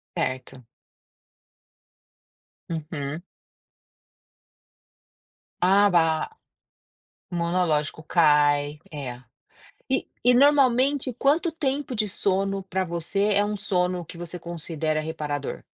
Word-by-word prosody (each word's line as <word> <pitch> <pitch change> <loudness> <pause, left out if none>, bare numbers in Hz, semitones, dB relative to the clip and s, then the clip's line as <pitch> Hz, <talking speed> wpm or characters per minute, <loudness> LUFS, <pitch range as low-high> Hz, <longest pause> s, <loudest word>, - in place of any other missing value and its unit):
Certo. 130 -1 -4 2.0
Uhum. 155 -1 -5 2.4
Ah 200 +3 +5
ba 165 - +2 1.0
monológico 170 -3 0
cai, 150 -2 +3
é! 130 -4 -6 0.7
E 265 - 0 0.2
e 245 0 +5
normalmente 270 0 +4
quanto 295 +8 +2
tempo 285 -4 -2
de 215 -1 +1
sono 195 0 0
para 190 0 -2
você 180 +5 0
é 200 +1 +4
um 210 0 -2
sono 180 -3 0
que 170 - -11
você 175 +1 -5
considera 160 -2 -2
reparador? 150 -3 -4
175 Hz, 85 wpm, -25 LUFS, 155-205 Hz, 2.4 s, Ah